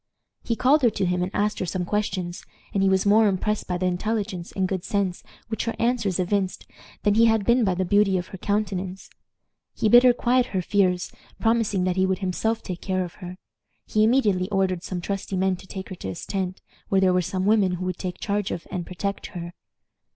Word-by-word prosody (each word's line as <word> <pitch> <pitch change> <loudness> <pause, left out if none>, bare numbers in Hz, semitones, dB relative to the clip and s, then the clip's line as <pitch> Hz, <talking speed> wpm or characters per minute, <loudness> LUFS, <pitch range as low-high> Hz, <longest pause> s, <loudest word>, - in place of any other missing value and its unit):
He 230 - -1
called 275 +6 +4
her 240 - +5
to 195 - -1
him 180 0 0
and 180 - -1
asked 210 +1 0
her - - -1
some 180 0 -2
questions; 185 -3 -2 0.3
and 195 - +1
he 195 - +4
was 190 0 +2
more 215 +2 +5
impressed 205 +2 -1
by 180 - -1
the 185 - -1
intelligence 190 0 -2
and 190 -1 0
good 185 -2 -3
sense 200 -5 -1 0.3
which 220 0 -3
her 230 - -2
answers 230 -6 +1
evinced 185 +1 -1 0.4
than 205 - +3
he 230 +2 +5
had 225 -3 +2
been 240 +1 +4
by 190 -4 +1
the 185 +1 0
beauty 200 0 +3
of 180 0 -4
her 190 - -9
countenance. 195 -2 -2 0.6
He 215 - +1
bid 240 +3 +9
her 250 0 +6
quiet 245 +1 +2
her 190 -6 -1
fears, 180 -2 +1 0.3
promising 225 -4 +1
that 185 0 0
he 190 0 +3
would 190 0 0
himself 210 +4 -1
take 180 -2 -6
care 185 -1 -1
of 175 - -10
her. 180 0 -7 0.5
He 215 - +2
immediately 210 -6 +2
ordered 190 -3 0
some 180 0 -4
trusty 195 0 -3
men 190 0 +2
to 190 - -14
take 190 0 -7
her 190 - -6
to - - -6
his 95 - -6
tent, 190 -2 -3 0.3
where 195 - +3
there 185 -1 +4
were 180 - +3
some 185 +2 -2
women 205 -3 +3
who 180 +1 -3
would 185 -1 -3
take 180 -2 -5
charge 205 -1 -1
of 170 - -5
and 180 -3 -4
protect 200 +2 -4
her. 170 -1 -7
190 Hz, 225 wpm, -24 LUFS, 185-210 Hz, 0.6 s, bid